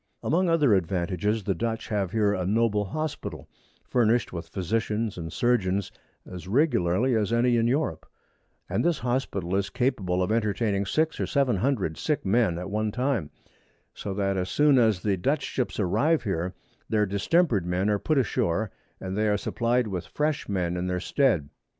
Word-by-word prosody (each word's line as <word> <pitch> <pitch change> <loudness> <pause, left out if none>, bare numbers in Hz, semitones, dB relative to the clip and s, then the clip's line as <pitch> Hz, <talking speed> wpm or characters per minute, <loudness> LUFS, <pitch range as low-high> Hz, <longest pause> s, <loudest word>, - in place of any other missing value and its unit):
Amongst 175 +5 +2
other 150 -8 +4
Advantages, 95 +3 0
the 95 - 0
Dutch 115 +2 -3
have 100 -4 0
here 105 0 +2
a 95 - -1
noble 105 +1 +1
Hospital, 155 +8 -5 0.4
furnished 120 -3 +1
with 85 -1 -5
Physicians 105 +4 -1
and 80 -2 -6
Surgeons 100 -5 +1 0.3
as 90 -1 -9
regularly 115 - +2
as 110 -1 0
any 120 +1 +3
in 115 0 +2
Europe; 140 +6 -1 0.6
and - - -1
this 170 -3 +2
Hospital 120 -8 -2
is 100 0 0
capable 100 -8 0
of 90 - -1
entertaining 105 -2 0
6 160 - 0
or - - -1
700 125 - 0
sick 150 -7 -1
Men 100 -3 +2
at 90 +2 -5
one 105 0 0
time; 125 - -1 0.6
so 100 - -6
that 100 -1 0
as 90 0 -2
soon 145 +1 +4
as 110 -6 +2
the 100 -3 +1
Dutch 140 - 0
Ships 125 -4 -3
arrive 145 - +2
here, 90 -4 -2 0.3
their 105 -1 +2
distemper'd 100 - +1
Men 90 +3 0
are 105 -1 +2
put 155 +6 0
ashore, 105 -5 0 0.3
and 95 0 -5
they 110 +1 +1
are 105 -1 +2
supplied 120 +3 0
with 90 -4 -4
fresh 150 -4 -2
Men 90 -3 -1
in 90 +1 -2
their 90 0 -1
stead. 105 - +1
105 Hz, 170 wpm, -26 LUFS, 95-125 Hz, 0.6 s, other